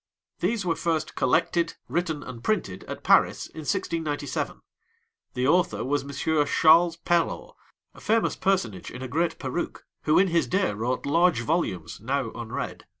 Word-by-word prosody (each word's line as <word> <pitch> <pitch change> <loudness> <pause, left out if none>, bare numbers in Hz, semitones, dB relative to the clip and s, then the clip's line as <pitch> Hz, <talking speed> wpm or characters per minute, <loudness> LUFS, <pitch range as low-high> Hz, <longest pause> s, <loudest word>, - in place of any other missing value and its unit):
These 200 +2 0
were 165 -2 +1
first 160 -2 -1
collected, 165 +6 +1
written, 165 -4 -2
and 120 -2 -9
printed 100 - -1
at - - -7
Paris - - +4
in 160 - -11
1697. 155 -3 -2 0.7
The 125 0 0
author 145 - +2
was 145 +2 0
Monsieur 145 +2 0
Charles 165 +3 +5
Perrault, 170 0 0 0.4
a - - -15
famous 225 +1 +1
personage 115 - -1
in 125 - -8
a - - -4
great 165 +6 0
perruque, 135 +6 -4 0.2
who 155 - +4
in 190 0 +5
his 170 0 +2
day 185 - +1
wrote 120 +5 -2
large 165 -2 +3
volumes 120 - -2
now 130 0 -1
unread. 115 -1 -6
155 Hz, 150 wpm, -26 LUFS, 130-175 Hz, 0.7 s, Charles